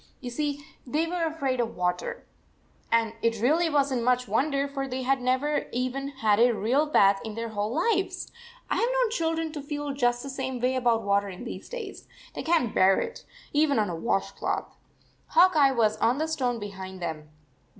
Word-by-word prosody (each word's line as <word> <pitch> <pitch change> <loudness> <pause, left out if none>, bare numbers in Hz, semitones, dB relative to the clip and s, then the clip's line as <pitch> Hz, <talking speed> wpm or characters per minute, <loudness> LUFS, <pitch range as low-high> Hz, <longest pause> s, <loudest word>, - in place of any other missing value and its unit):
You 245 - -6
see, 290 +2 -2 0.2
they 300 +6 0
were 340 0 -1
afraid 280 -6 -1
of 235 -1 -1
water, 180 0 -2 0.7
and 230 -1 +2
it 230 -1 +1
really 315 +9 +3
was 285 -2 +2
n 255 - 0
t - - -3
much 250 0 +2
wonder, 275 +6 +1
for 275 -1 -4
they 260 0 -3
had 265 0 +1
never 260 +4 0
even 255 +3 -2
had 225 -7 +1
a 240 0 +5
real 255 +9 +1
bath 200 -9 +4
in 220 -2 -6
their 230 0 -4
whole 210 0 -2
lives. 380 +3 0 0.4
I - - 0
ve - - +1
known - - +1
children 325 -5 -1
to 300 -2 -6
feel 290 0 -4
just 245 -3 +1
the 275 - -6
same 260 -1 -4
way 250 +2 +1
about 240 -3 +2
water 200 0 +1
in 185 -1 -8
these - - -7
days. 460 -5 -7 0.3
They - - -4
can 320 -7 +2
t - - -12
bear 190 +1 +5
it, 465 +2 -5 0.3
even 295 -1 +3
on 210 -4 +1
a - - -3
wash 195 +2 -1
cloth. - - -3 0.5
Hawk 375 -7 +5
Eye 280 -3 +5
was 220 -4 +2
on 240 +3 +2
the 315 +2 0
stone 255 -7 -1
behind 190 -3 -7
them. 160 -3 -5
255 Hz, 205 wpm, -27 LUFS, 225-295 Hz, 0.7 s, a